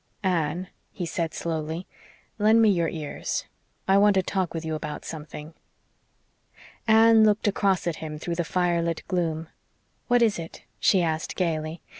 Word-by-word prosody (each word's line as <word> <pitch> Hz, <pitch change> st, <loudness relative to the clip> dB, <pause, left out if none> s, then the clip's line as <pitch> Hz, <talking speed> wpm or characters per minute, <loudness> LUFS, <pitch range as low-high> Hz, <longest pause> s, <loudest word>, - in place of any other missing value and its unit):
"Anne," 175 Hz, -1 st, 0 dB, 0.2 s
he 180 Hz, -, -4 dB
said 165 Hz, 0 st, -2 dB
slowly, 160 Hz, +2 st, -3 dB, 0.5 s
"lend 215 Hz, +2 st, +5 dB
me 225 Hz, -1 st, +6 dB
your 170 Hz, -4 st, +1 dB
ears. 155 Hz, -3 st, -4 dB, 0.4 s
I 195 Hz, +1 st, +5 dB
want 205 Hz, 0 st, +5 dB
to 190 Hz, -, +3 dB
talk 185 Hz, -1 st, -1 dB
with 165 Hz, -1 st, -5 dB
you 160 Hz, -, -2 dB
about 150 Hz, -1 st, -5 dB
something." 155 Hz, 0 st, -8 dB, 1.3 s
Anne 225 Hz, 0 st, +6 dB
looked 215 Hz, 0 st, +3 dB
across 195 Hz, -3 st, +1 dB
at 170 Hz, -2 st, -1 dB
him 155 Hz, -1 st, -6 dB
through 170 Hz, +3 st, -4 dB
the 170 Hz, 0 st, -1 dB
fire 175 Hz, 0 st, +1 dB
lit 165 Hz, -1 st, -2 dB
gloom. 165 Hz, -3 st, -1 dB, 0.6 s
"What 245 Hz, -1 st, +4 dB
is 215 Hz, -6 st, +2 dB
it?" 165 Hz, 0 st, -9 dB, 0.2 s
she 185 Hz, -3 st, +4 dB
asked 160 Hz, -1 st, -2 dB
gaily. 160 Hz, -2 st, -2 dB
170 Hz, 160 wpm, -26 LUFS, 160-195 Hz, 1.3 s, me